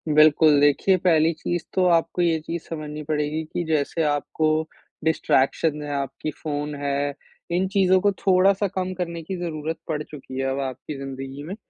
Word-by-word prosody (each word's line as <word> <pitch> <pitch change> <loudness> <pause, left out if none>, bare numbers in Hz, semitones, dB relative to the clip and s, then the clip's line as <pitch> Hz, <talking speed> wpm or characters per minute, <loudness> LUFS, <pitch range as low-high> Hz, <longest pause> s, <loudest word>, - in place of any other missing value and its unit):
बिल्कुल, 155 -1 +6
देखिए 145 +6 +4
पहली 165 -2 +3
चीज़ 175 +2 -3
तो 185 -1 +2
आपको 165 +2 +1
ये 165 -2 +2
चीज़ 165 +2 -5
समझनी 150 -2 -5
पड़ेगी 150 +1 -1
कि 175 - -1
जैसे 160 +1 0
आपको 150 +1 0 0.6
डिस्ट्रैक्शन 150 -1 +1
है, 145 - -6
आपकी 140 +2 -3
फ़ोन 145 0 -4
है। 140 0 0 0.4
इन 185 +2 +1
चीज़ों 190 -1 +4
को 205 +1 +3
थोड़ा-सा 195 +1 +3
कम 185 0 -1
करने 170 -2 -3
की 190 +3 -4
ज़रूरत 160 -2 -3
पड़ 150 -2 -2
चुकी 135 -3 -10
है 135 - 0
अब 135 - -2
आपकी 135 +2 -5
ज़िंदगी 135 +1 -7
में। 185 +6 -6
155 Hz, 170 wpm, -24 LUFS, 145-175 Hz, 0.6 s, बिल्कुल